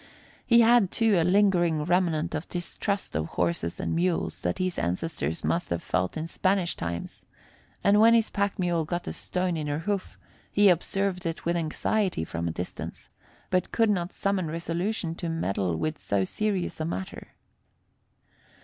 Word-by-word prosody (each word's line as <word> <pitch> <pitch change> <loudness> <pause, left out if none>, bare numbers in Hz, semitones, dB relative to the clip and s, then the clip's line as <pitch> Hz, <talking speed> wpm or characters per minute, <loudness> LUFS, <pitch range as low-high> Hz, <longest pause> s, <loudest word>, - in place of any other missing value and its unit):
He 235 -1 +7
had, 230 -4 +5
too, 225 -1 +2
a 170 - +4
lingering 175 -4 +3
remnant 170 -2 +1
of 155 +2 -3
the - - -16
distrust 195 +3 -3
of 80 +1 0
horses 85 -1 -1
and - - -1
mules 175 +1 0
that - - -1
his 185 -1 -1
ancestors 85 - -2
must 170 +1 0
have 85 -1 -2
felt 90 - -1
in 155 - -2
Spanish 185 +1 0
times, 85 0 -5 0.6
and 205 +1 +5
when 230 +2 +7
his 225 -1 +2
pack 200 0 0
mule 175 -3 +1
got 175 +3 -4
a - - -3
stone 180 -1 -2
in 155 -2 -3
her 145 0 -1
hoof, 195 +4 -3 0.3
he 205 -1 +5
observed 185 +1 0
it 165 - -5
with 170 +1 +1
anxiety 175 - 0
from 85 +1 -3
a - - -1
distance, 90 +2 -6 0.4
but 185 -1 +1
could 225 -2 +3
not 180 -3 -1
summon 195 -3 -1
resolution 170 +3 -2
to 170 0 -4
meddle 100 - -1
with 155 - -2
so 100 -1 0
serious 195 - -2
a 155 - -1
matter. 95 - -6
175 Hz, 170 wpm, -27 LUFS, 155-195 Hz, 0.6 s, He